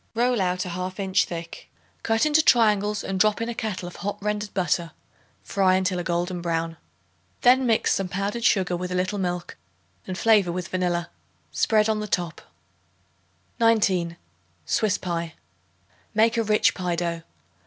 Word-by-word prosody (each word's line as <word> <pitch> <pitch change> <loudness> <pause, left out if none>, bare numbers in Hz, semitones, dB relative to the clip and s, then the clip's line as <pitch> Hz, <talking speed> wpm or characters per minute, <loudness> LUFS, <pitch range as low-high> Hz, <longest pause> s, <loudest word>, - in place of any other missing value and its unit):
Roll 240 -1 +2
out 180 0 0
a - - -5
half 185 +2 -5
inch 190 -1 +2
thick. 165 -1 -8 0.3
Cut 225 +2 +1
into 305 +1 +4
triangles 210 -6 +3
and 190 -1 -3
drop 215 +1 +3
in 230 +1 -2
a - - -2
kettle 215 -5 -4
of 175 - -10
hot 205 +1 -4
rendered 210 0 -2
butter; 175 -3 -1 0.5
fry 190 -2 +2
until 185 -1 0
a - - -3
golden 175 +1 -2
brown. 165 -1 -2 0.6
Then 255 +1 +5
mix 225 -2 +2
some 195 - -1
powdered 200 +5 -3
sugar 185 -5 +2
with 180 +1 -4
a - - -1
little 185 +3 -1
milk 180 -1 -3 0.5
and 185 -1 -4
flavor 210 -5 +4
with 180 +1 -4
vanilla. 175 -2 -1 0.4
Spread 215 -1 +2
on 215 -1 0
the 210 - -4
top. 175 -4 -2 1.2
19. 190 -7 +2 0.5
Swiss 205 - +1
Pie. 170 -2 -4 0.8
Make 225 +2 +4
a 230 - +2
rich 215 -1 +3
pie 180 -2 -2
dough. 170 -1 -2
190 Hz, 165 wpm, -24 LUFS, 175-215 Hz, 1.2 s, Then